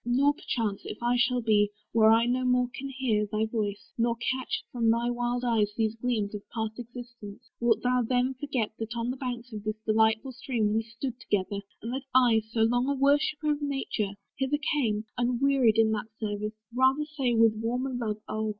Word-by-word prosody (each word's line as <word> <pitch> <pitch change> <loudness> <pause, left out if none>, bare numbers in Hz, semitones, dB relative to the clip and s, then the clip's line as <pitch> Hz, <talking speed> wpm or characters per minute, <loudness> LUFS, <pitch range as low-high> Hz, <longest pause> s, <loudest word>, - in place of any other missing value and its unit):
Nor, 265 +4 +3
perchance, 225 - -2
If - - -6
I 240 +1 +2
should 245 -1 +1
be, 205 -2 +4 0.2
where 220 -1 +5
I 225 +1 +5
no 250 +1 +1
more 250 0 +3
can 275 +2 -5
hear 240 -6 0
Thy 215 0 +1
voice, 220 -1 -3
nor 235 0 +2
catch 255 +2 -2
from 235 -2 +1
thy 235 +1 +2
wild 245 0 -1
eyes 215 -3 +2
these 220 -1 +1
gleams 225 -3 -1
Of 210 - -5
past 220 0 -4
existence, 240 -1 -10
wilt 235 -1 +2
thou 250 0 +3
then 250 +2 +1
forget 260 -4 -2
That 225 +1 -4
on 235 +1 -1
the - - -4
banks 245 -2 -5
of 210 -1 -6
this 215 0 -2
delightful 220 +3 +2
stream 235 -4 -1
We 220 - +2
stood 230 +3 -6
together; 205 -2 -1 0.2
and 230 +2 -4
that 265 - -2
I, 240 -4 +5
so 225 0 -1
long 245 +4 +2
A 280 - +1
worshipper 290 +2 +2
of 295 0 -1
Nature, 270 -8 -2 0.2
hither 270 +2 +1 0.2
came, 220 -7 0
Unwearied 245 -1 +3
in 220 -1 +4
that 215 0 -2
service: 210 0 -3 0.2
rather 260 +4 +3
say 275 -6 -1
With 225 -1 +5
warmer 245 +4 -2
love, 215 -4 -3
oh! 215 0 -2
235 Hz, 195 wpm, -28 LUFS, 220-255 Hz, 0.2 s, where